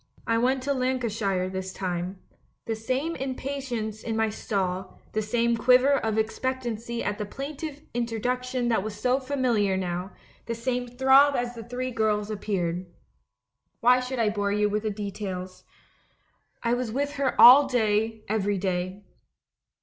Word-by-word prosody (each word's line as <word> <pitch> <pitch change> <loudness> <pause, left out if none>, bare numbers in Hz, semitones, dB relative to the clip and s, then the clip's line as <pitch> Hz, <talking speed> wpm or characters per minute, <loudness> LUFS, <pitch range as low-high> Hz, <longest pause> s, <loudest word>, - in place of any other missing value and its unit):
I 230 0 +2
went 255 +2 +1
to 280 +1 +1
Lancashire 230 -8 0
this 190 0 -4
time. 180 0 -3 0.5
The 225 - -2
same 260 +9 -2
impatience 260 -5 -4
in 225 - -3
my 220 -1 +1
stall, 185 -3 -3
the 215 - +1
same 235 +2 +1
quiver 250 +4 +5
of 220 -5 -1
expectancy 235 0 -2
at 205 +1 -2
the 210 - -2
plaintive 290 +4 -6
introduction 245 +2 -1
that 225 -5 +2
was 210 0 -6
so 255 +1 +2
familiar 250 -8 +1
now, 180 0 -3 0.4
the 230 - -2
same 245 +1 -2
throb 265 +3 +5
as 245 0 -1
the 230 -1 -8
three 250 +2 -4
girls 215 -2 0
appeared. 185 -4 -2 0.9
Why 250 +1 +6
should 255 +1 -4
I 225 -3 +2
bore 205 -1 -1
you 210 0 +2
with 210 +1 -1
details? 195 -3 -5 1.0
I 235 0 +2
was 245 -2 -1
with 285 +4 -1
her 275 -1 0
all 270 +3 +10
day, 220 -3 0
every 205 -1 0
day. 185 +1 -2
225 Hz, 150 wpm, -26 LUFS, 205-255 Hz, 1.0 s, all